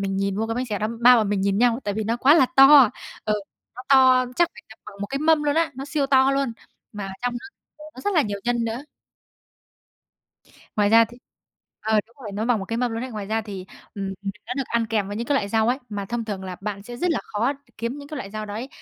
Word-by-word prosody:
mình 195 Hz, -1 st, -2 dB
nhìn 195 Hz, 0 st, -1 dB
vô 220 Hz, +2 st, -1 dB
cái 225 Hz, -, -2 dB
bánh 250 Hz, +2 st, -2 dB
xèo 210 Hz, -3 st, -3 dB
đó, 215 Hz, -, -1 dB
3 245 Hz, +1 st, +8 dB
bọn 215 Hz, -3 st, +1 dB
mình 205 Hz, -1 st, 0 dB
nhìn 195 Hz, 0 st, +1 dB
nhau, 240 Hz, +1 st, +3 dB
tại 205 Hz, -, -2 dB
vì 220 Hz, +1 st, -2 dB
nó 230 Hz, +3 st, 0 dB
quá 275 Hz, +5 st, +5 dB
là 265 Hz, -6 st, +5 dB
to. 270 Hz, -3 st, +9 dB, 0.4 s
Ừ, 215 Hz, -1 st, +1 dB, 0.4 s
nó 250 Hz, -, -8 dB
to 260 Hz, -2 st, +6 dB
chắc 345 Hz, -1 st, +4 dB
phải -, -, -13 dB
tầm 220 Hz, -, -15 dB
bằng 200 Hz, -, -11 dB
một 205 Hz, -, -2 dB
cái 275 Hz, -, -3 dB
mâm 310 Hz, 0 st, +3 dB
luôn 290 Hz, -1 st, +1 dB
á, 325 Hz, 0 st, +2 dB
nó 270 Hz, +1 st, -6 dB
siêu 290 Hz, -1 st, -1 dB
to 265 Hz, -1 st, +4 dB
luôn, 275 Hz, -3 st, 0 dB, 0.4 s
mà 205 Hz, -2 st, -5 dB
trong 245 Hz, 0 st, 0 dB
đó 240 Hz, +9 st, -7 dB, 0.3 s
thì -, -, -13 dB
nó 255 Hz, -, -10 dB
rất 405 Hz, +9 st, -1 dB
là 320 Hz, -, +5 dB
nhiều 205 Hz, -4 st, -3 dB
nhân 240 Hz, -1 st, 0 dB
nữa. 230 Hz, +4 st, -3 dB, 1.9 s
Ngoài 205 Hz, -1 st, +3 dB
ra 230 Hz, +2 st, +7 dB
thì 240 Hz, +2 st, -14 dB, 0.6 s
ờ, 220 Hz, 0 st, +2 dB
đúng 235 Hz, -, -28 dB
rồi, 210 Hz, -5 st, -7 dB
nó 210 Hz, +2 st, -2 dB
bằng 240 Hz, -1 st, +2 dB
một 195 Hz, -, -5 dB
cái 225 Hz, +4 st, -3 dB
mâm 245 Hz, -1 st, 0 dB
luôn 230 Hz, -, -3 dB
ấy. 260 Hz, -, -7 dB
Ngoài 210 Hz, -3 st, -6 dB
ra 220 Hz, +1 st, -1 dB
thì, 195 Hz, -3 st, -8 dB, 0.3 s
ừm, 195 Hz, -1 st, -4 dB, 0.3 s
nó 250 Hz, -, -3 dB
được 275 Hz, -, -1 dB
ăn 235 Hz, -1 st, 0 dB
kèm 210 Hz, -3 st, -1 dB
với 205 Hz, -, -5 dB
những 235 Hz, +2 st, -4 dB
cái 290 Hz, -, +1 dB
loại 205 Hz, -7 st, 0 dB
rau 220 Hz, +1 st, +2 dB
ấy, 255 Hz, -, +1 dB
mà 205 Hz, -2 st, -4 dB
thông 235 Hz, +2 st, -3 dB
thường 200 Hz, -3 st, -5 dB
là 185 Hz, -1 st, -6 dB
bạn 200 Hz, -1 st, -5 dB
sẽ 240 Hz, +2 st, -9 dB
rất 355 Hz, +8 st, 0 dB
là 325 Hz, -, 0 dB
khó 230 Hz, +6 st, -1 dB, 0.3 s
kiếm 235 Hz, +5 st, -3 dB
những 285 Hz, -, -10 dB
cái 305 Hz, -, -6 dB
loại 200 Hz, -7 st, -6 dB
rau 215 Hz, +1 st, -5 dB
đấy 220 Hz, +6 st, -5 dB
230 Hz, 275 wpm, -23 LUFS, 210-260 Hz, 1.9 s, to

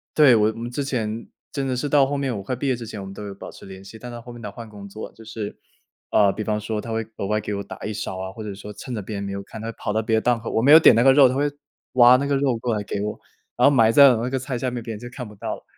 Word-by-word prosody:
对， 145 Hz, -6 st, +7 dB
我 110 Hz, 0 st, +4 dB
我 110 Hz, -, -6 dB
们 120 Hz, +1 st, -5 dB
之 140 Hz, +3 st, -2 dB
前 115 Hz, -4 st, -3 dB, 0.2 s
真 140 Hz, -2 st, -2 dB
的 130 Hz, -, -1 dB
是 145 Hz, +4 st, -2 dB
到 140 Hz, -1 st, +5 dB
后 140 Hz, +1 st, -2 dB
面， 135 Hz, -3 st, -1 dB
我 100 Hz, -, -6 dB
快 130 Hz, -, -3 dB
毕 135 Hz, +3 st, -3 dB
业 130 Hz, -, +2 dB
之 120 Hz, -1 st, -8 dB
前 105 Hz, -2 st, -7 dB
我 -, -, -7 dB
们 95 Hz, -, -8 dB
都 105 Hz, -, -8 dB
有 100 Hz, -, -6 dB
保 -, -, -9 dB
持 -, -, -13 dB
联 95 Hz, 0 st, -11 dB
系， 100 Hz, +3 st, -11 dB
但 125 Hz, 0 st, -8 dB
他 120 Hz, -, -8 dB
后 120 Hz, +1 st, -11 dB
面 120 Hz, -, -11 dB
他 105 Hz, -, -6 dB
换 115 Hz, -2 st, -10 dB
工 100 Hz, -1 st, -10 dB
作 110 Hz, +2 st, -8 dB
就 110 Hz, -, -15 dB
是， 110 Hz, -2 st, -6 dB, 0.5 s
呃， 100 Hz, -2 st, +5 dB
比 -, -, -5 dB
方 105 Hz, 0 st, -1 dB
说 105 Hz, +1 st, -3 dB
他 115 Hz, -, -7 dB
会 110 Hz, 0 st, -1 dB
额 100 Hz, -, -3 dB
外 105 Hz, +1 st, +1 dB
给 105 Hz, -, -4 dB
我 100 Hz, -, -3 dB
打 -, -, -9 dB
一 105 Hz, -, -4 dB
勺 100 Hz, -2 st, -4 dB
啊， 95 Hz, 0 st, -5 dB
或 110 Hz, -, -10 dB
者 105 Hz, -2 st, -6 dB
说 105 Hz, +1 st, -9 dB
趁 125 Hz, +4 st, -7 dB
着 105 Hz, -, -3 dB
别 105 Hz, +2 st, -6 dB
人 100 Hz, -, -4 dB
没 100 Hz, 0 st, -4 dB
有 100 Hz, 0 st, -5 dB
看， 110 Hz, +2 st, -10 dB
他 115 Hz, -, -5 dB
会 115 Hz, -, -8 dB
跑 105 Hz, -, -3 dB
到 110 Hz, -, +1 dB
别 110 Hz, 0 st, 0 dB
的 -, -, +1 dB
档 120 Hz, 0 st, +2 dB
口 115 Hz, -, -6 dB
我 110 Hz, -, +1 dB
没 140 Hz, -, +5 dB
有 160 Hz, -, +11 dB
点 160 Hz, -, +7 dB
那 115 Hz, -, +4 dB
个 135 Hz, -, +7 dB
肉， 140 Hz, -1 st, +7 dB
他 130 Hz, -, -2 dB
会， 145 Hz, +2 st, +1 dB, 0.4 s
挖 125 Hz, 0 st, +8 dB
那 140 Hz, -, -1 dB
个 140 Hz, -, +1 dB
肉 135 Hz, -4 st, +1 dB
过 120 Hz, 0 st, -1 dB
来 105 Hz, -, -2 dB
给 100 Hz, -, -4 dB
我， 105 Hz, +1 st, -4 dB, 0.4 s
然 -, -, +5 dB
后 -, -, +1 dB
埋 115 Hz, -3 st, +5 dB
在 140 Hz, +2 st, +8 dB
我 115 Hz, -, -2 dB
那 125 Hz, -, -1 dB
个 135 Hz, 0 st, -1 dB
菜 130 Hz, 0 st, -4 dB
下 125 Hz, +1 st, -2 dB
面， 120 Hz, -1 st, -4 dB
别 115 Hz, -, -5 dB
人 105 Hz, -, -8 dB
就 120 Hz, -, -8 dB
看 125 Hz, -1 st, -7 dB
不 105 Hz, -, -13 dB
到 -, -, -4 dB
了， -, -, -16 dB
115 Hz, 390 characters per minute, -23 LUFS, 105-125 Hz, 0.5 s, 有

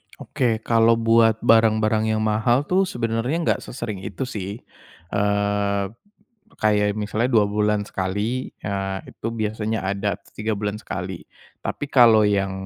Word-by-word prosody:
Oke. 115 Hz, -3 st, -1 dB
Kalau 115 Hz, 0 st, +4 dB
buat 115 Hz, -1 st, +3 dB
barang-barang 110 Hz, -1 st, +3 dB
yang 110 Hz, -, -1 dB
mahal 110 Hz, +5 st, +2 dB
tuh 190 Hz, +2 st, +3 dB
sebenarnya 115 Hz, +2 st, -1 dB
enggak -, -, +1 dB
sesering 115 Hz, -6 st, -5 dB
itu 95 Hz, +4 st, -5 dB
sih, 105 Hz, -4 st, -5 dB, 0.5 s
eee, 100 Hz, 0 st, 0 dB, 0.7 s
kayak 105 Hz, -1 st, +2 dB
misalnya 110 Hz, +3 st, -1 dB
2 110 Hz, -4 st, +4 dB
bulan 105 Hz, 0 st, +1 dB
sekali, 105 Hz, +8 st, -2 dB
eee, 95 Hz, -1 st, -2 dB
itu -, -, -8 dB
biasanya 110 Hz, -1 st, -2 dB
ada 100 Hz, +1 st, -1 dB
atau -, -, -24 dB
3 110 Hz, +1 st, -2 dB
bulan 105 Hz, 0 st, -3 dB
sekali, 90 Hz, -3 st, -6 dB, 0.4 s
tapi 145 Hz, -, -4 dB
kalau 115 Hz, -4 st, +6 dB
yang, 100 Hz, -2 st, +1 dB
110 Hz, 135 wpm, -22 LUFS, 100-115 Hz, 0.7 s, kalau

